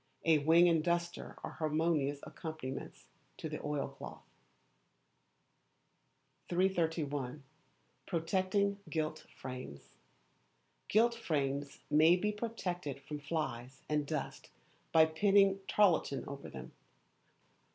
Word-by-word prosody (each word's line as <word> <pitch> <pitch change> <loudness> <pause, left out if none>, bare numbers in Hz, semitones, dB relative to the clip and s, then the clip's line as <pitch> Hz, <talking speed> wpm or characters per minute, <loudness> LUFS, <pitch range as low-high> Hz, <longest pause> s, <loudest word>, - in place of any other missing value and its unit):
A 160 -2 +5
wing 165 +4 +6
and 165 -2 +3
duster 170 0 -2
are - - -4
harmonious 155 -3 0
accompaniments 155 -6 -6 0.3
to - - -4
the - - -6
oilcloth. 145 -1 -4 2.3
331. 160 -7 0 0.6
Protecting 190 +4 +1
Gilt 155 0 -2
Frames. 125 - -8 0.9
Gilt 235 +3 +4
frames 140 -9 -2
may 155 +3 +7
be 210 +4 0
protected 180 - -4
from 145 +2 -6
flies 135 -4 -4
and 150 -1 0
dust 150 -3 -4 0.4
by 160 -1 +7
pinning 195 +4 +4
tarlatan 165 - +3
over 140 0 -7
them. - - -9
160 Hz, 95 wpm, -34 LUFS, 145-180 Hz, 2.3 s, may